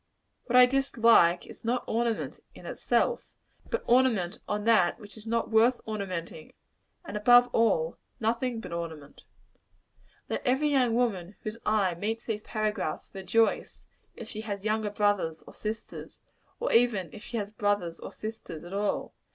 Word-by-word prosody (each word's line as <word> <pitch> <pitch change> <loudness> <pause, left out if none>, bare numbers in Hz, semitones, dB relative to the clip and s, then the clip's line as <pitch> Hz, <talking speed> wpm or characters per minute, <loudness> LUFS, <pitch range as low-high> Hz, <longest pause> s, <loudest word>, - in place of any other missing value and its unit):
What 250 - -1
I 250 0 +10
dislike 230 -9 +4
is, - - -13
not 240 +2 0
ornament, 230 0 -1 0.2
in - - -13
itself, 485 - 0 0.4
but 470 - -2
ornament 235 -8 +2
on 210 0 -2
that 215 -5 +3
which 210 -2 -12
is 220 0 -11
not 230 0 -1
worth 230 +3 +4
ornamenting; 185 -7 -5 0.5
and - - -7
above 245 +4 +6
all, 185 -8 +2 0.2
nothing 235 +1 -1
but - - -9
ornament. 160 -4 -7 1.0
Let - - -2
every 270 +3 +2
young 255 -5 +3
woman 205 -6 -1
whose 215 +2 -5
eye 205 -4 +2
meets 220 +6 -3
these 215 -2 -3
paragraphs, 215 -8 -3
rejoice, 195 +4 0 0.3
if 230 - -8
she 215 -1 -6
has 205 -2 -5
younger 215 0 0
brothers 205 -6 0
or - - -13
sisters 220 +1 -6 0.4
or - - -1
even 230 -7 +3
if 210 - -10
she 235 - -5
has 205 -1 -3
brothers 205 -5 -1
or - - -8
sisters 215 -7 -7
at 175 +2 -9
all. 205 +1 -1
215 Hz, 155 wpm, -28 LUFS, 195-235 Hz, 1.0 s, I